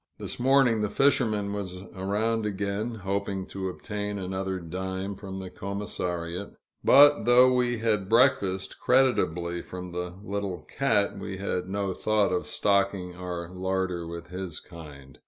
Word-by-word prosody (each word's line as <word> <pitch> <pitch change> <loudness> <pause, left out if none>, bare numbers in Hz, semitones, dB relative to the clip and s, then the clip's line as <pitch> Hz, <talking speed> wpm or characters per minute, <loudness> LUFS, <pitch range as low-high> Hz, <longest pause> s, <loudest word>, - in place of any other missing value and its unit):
This - - -5
morning 125 -3 +4
the 105 - 0
fisherman 110 -8 +2
was 95 -2 -5
around 105 +4 0
again, 100 +3 -2
hoping 100 -1 -2
to 95 -1 -3
obtain 105 +2 -4
another 95 0 -3
dime 95 +3 -4
from 95 -1 -7
the 95 -1 -7
commissariat; 90 -2 -4 0.3
but 145 +2 +7
though 125 +1 +7
we 120 -1 +2
had 105 -4 0
breakfasted 100 -6 +3
creditably 90 -10 +2
from 90 -1 -8
the 90 +1 -5
little 100 -3 -3
"cat," 120 -7 0
we 95 - -5
had 95 -1 -3
no 100 -1 -1
thought 105 0 +1
of 90 - -1
stocking 100 -3 +1
our 90 -1 -5
larder 95 -2 -2
with 85 0 -7
his 90 -3 -5
kind. 70 -5 -12
95 Hz, 140 wpm, -27 LUFS, 90-105 Hz, 0.3 s, but